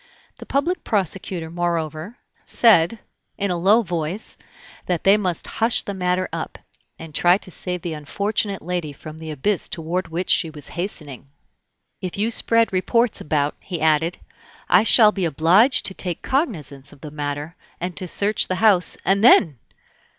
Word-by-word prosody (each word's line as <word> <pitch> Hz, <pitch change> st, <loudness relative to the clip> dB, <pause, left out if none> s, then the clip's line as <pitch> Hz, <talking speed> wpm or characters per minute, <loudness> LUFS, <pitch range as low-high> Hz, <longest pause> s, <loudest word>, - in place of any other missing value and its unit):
The -, -, -11 dB
public 320 Hz, +7 st, -1 dB
prosecutor, 185 Hz, -4 st, -2 dB
moreover, 170 Hz, +3 st, -3 dB, 0.3 s
said, 220 Hz, -3 st, +4 dB, 0.4 s
in 200 Hz, -1 st, -1 dB
a -, -, 0 dB
low 200 Hz, +7 st, +3 dB
voice, 175 Hz, +2 st, -3 dB, 0.5 s
that 175 Hz, -3 st, -1 dB
they 195 Hz, +1 st, +6 dB
must 185 Hz, -5 st, -2 dB, 0.2 s
hush 225 Hz, +1 st, +4 dB
the 200 Hz, -, -5 dB
matter 180 Hz, -1 st, -1 dB
up, -, -, -5 dB, 0.4 s
and 160 Hz, -1 st, -11 dB
try 175 Hz, +4 st, +3 dB
to 190 Hz, -, -11 dB
save 180 Hz, 0 st, -5 dB
the 170 Hz, -, -4 dB
unfortunate 200 Hz, +6 st, -2 dB
lady 175 Hz, -3 st, -3 dB
from 155 Hz, +2 st, -11 dB
the 160 Hz, 0 st, -8 dB
abyss 165 Hz, +7 st, -1 dB
toward 170 Hz, +3 st, -3 dB
which 170 Hz, +3 st, -2 dB
she 165 Hz, -, +2 dB
was 150 Hz, -2 st, -9 dB
hastening. 150 Hz, -8 st, -6 dB, 0.7 s
"If 185 Hz, 0 st, -5 dB
you 215 Hz, +3 st, 0 dB
spread 230 Hz, -2 st, +2 dB
reports 230 Hz, +5 st, +1 dB
about," 150 Hz, -1 st, -1 dB
he 175 Hz, -3 st, -5 dB
added, 160 Hz, +2 st, +1 dB, 0.5 s
"I 180 Hz, -, +5 dB
shall 220 Hz, -1 st, +6 dB
be 195 Hz, -4 st, -2 dB
obliged 175 Hz, -, +4 dB
to 190 Hz, -, +1 dB
take 180 Hz, -3 st, -5 dB
cognizance 155 Hz, -, -2 dB
of 140 Hz, -, -18 dB
the 150 Hz, -, -9 dB
matter, 145 Hz, +2 st, -5 dB, 0.2 s
and 180 Hz, 0 st, -4 dB
to 185 Hz, -, -1 dB
search 205 Hz, +4 st, +1 dB
the 185 Hz, -, -1 dB
house, 195 Hz, -3 st, +4 dB
and 195 Hz, +3 st, +2 dB
then!..." 165 Hz, -, +5 dB
180 Hz, 165 wpm, -21 LUFS, 160-205 Hz, 0.7 s, they